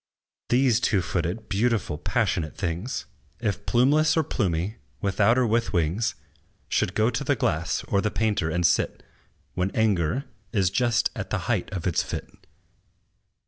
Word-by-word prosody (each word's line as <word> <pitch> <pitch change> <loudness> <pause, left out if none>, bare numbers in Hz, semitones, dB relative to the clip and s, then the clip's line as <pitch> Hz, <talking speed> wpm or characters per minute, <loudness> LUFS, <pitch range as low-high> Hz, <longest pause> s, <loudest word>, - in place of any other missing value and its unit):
These 125 -2 +4
two 100 -7 +1
footed, 90 +6 -2
beautiful, 105 -7 0
passionate 75 0 -1
things, 90 +7 -3 0.3
If 105 -3 -2
plumeless 145 +7 +4
or 160 - +4
plumy, 95 - -1 0.2
without 105 +4 +3
or 130 - +3
with 115 0 +1
wings, 90 +6 +1 0.5
Should 90 - 0
go 110 +3 +3
to 130 +4 -2
the 140 +1 +2
glass, 80 -8 0
or 100 - +1
the 105 - 0
painter, 105 -7 0
and 85 +2 0
sit 85 0 +1 0.5
When 90 +1 0
anger 110 - +1 0.3
is 95 -5 +2
just 120 +1 +2
at - - -5
the - - -1
height - - -1
of 90 - -4
its 90 - +2
fit. - - -5
105 Hz, 150 wpm, -25 LUFS, 90-120 Hz, 0.5 s, These